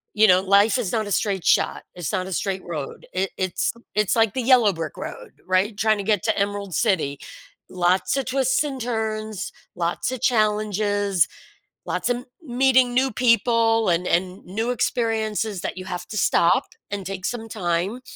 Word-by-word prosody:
you 215 - +6
know, 185 0 +5
life 200 +4 +4
is 205 -7 -2
not 220 -2 0
a - - -6
straight 195 -3 0
shot. - - +2
It's 175 -5 -4
not 185 -1 -1
a 190 - -4
straight 190 0 -2
road. 155 -5 -6
It 190 +1 -1
it's 185 -2 0 0.2
it's 210 0 +2
like 225 -3 +3
the 260 - -1
yellow 240 -5 +5
brick 165 -2 -5
road, - - -8
right? 190 +3 +1
Trying 215 -1 +2
to - - -3
get 205 -3 +1
to - - 0
Emerald 200 -2 -2
City. 185 -11 +1 0.5
Lots 185 +7 +1
of 270 - -1
twists 260 +1 +1
and 270 -4 -5
turns, 220 -2 -3 0.2
lots 175 +7 -1
of 255 - -4
challenges, 210 -4 +1 0.6
lots - - -2
of 245 - +1
m 250 - -9 0.2
meeting 255 -1 +3
new 260 +2 +2
people 230 -1 +3
and 175 +1 +1
and 180 +2 -1
new 220 +6 -2
experiences 220 -4 -1
that - - -4
you 185 - -6
have 180 -1 -5
to 215 - -6
stop 170 -3 +3 0.3
and 200 -2 -4
take 190 -1 -5
some 225 -1 -3
time 190 +4 -2
210 Hz, 180 wpm, -23 LUFS, 185-230 Hz, 0.6 s, you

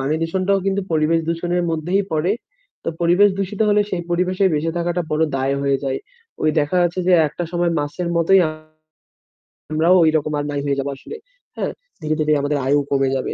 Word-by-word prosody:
পানি 140 +3 0
দূষণটাও 190 +4 +1
কিন্তু 195 +1 +1
পরিবেশ 160 +1 +2
দূষণের 175 +1 -1
মধ্যেই 175 +5 0
পড়ে। 165 +6 +1 0.5
তো - - -2
পরিবেশ 175 +4 +5
দূষিত 195 +2 -3
হলে 210 0 +4
সেই 175 -2 -2
পরিবেশে 185 +2 +1
বেঁচে 155 +2 0
থাকাটা 175 +1 -1
বড় 155 - +1
দায় 135 +1 0
হয়ে 140 -1 +2
যায়। 135 0 -1 0.4
ওই 155 - +3
দেখা 145 +5 -1
যাচ্ছে 175 +1 0
যে, 185 - +5 0.2
একটা 175 +4 -5
সময়মাছের 170 -1 -1
মতোই 185 +3 +5 1.3
আমরাও 165 +4 +4
ওই 160 - +4
রকম 155 0 -3
আর 145 - -3
নাই 145 -1 -2
হয়ে 140 -1 0
যাব 135 - -2
আসলে, 290 - -10 0.4
হ্যাঁ? - - -2 0.3
ধীরে, 155 0 -1
ধীরে 155 0 +2
আমাদের 145 +1 0
আয়ু 145 +2 +3
কমে 135 -1 +2
যাবে। - - -3
165 Hz, 185 wpm, -20 LUFS, 150-180 Hz, 1.3 s, পরিবেশ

